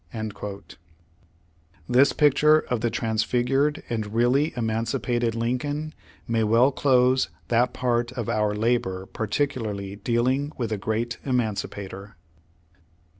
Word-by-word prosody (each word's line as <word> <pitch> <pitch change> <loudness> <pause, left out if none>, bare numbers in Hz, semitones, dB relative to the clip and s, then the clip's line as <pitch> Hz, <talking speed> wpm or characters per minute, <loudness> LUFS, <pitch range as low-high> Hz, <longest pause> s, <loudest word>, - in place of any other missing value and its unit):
^ 105 -3 -6 1.1
This 130 +3 +5
picture 150 +1 +4
of 120 -3 0
the 120 - +1
transfigured 125 +7 0
and 110 -2 -4
really 130 +6 +3
emancipated 115 +1 -1
Lincoln, 145 +6 -2 0.3
may 115 -1 +1
well 115 +5 +4
close 130 -1 +3 0.2
that 120 +1 +3
part 120 -1 0
of 120 -4 -4
our 105 -1 0
labor 105 -4 0
particularly 105 -4 -3
dealing 130 +7 0
with 115 -3 -3
the 110 - 0
Great 115 +4 -2
Emancipator. 105 -5 -3
120 Hz, 110 wpm, -25 LUFS, 110-130 Hz, 1.1 s, This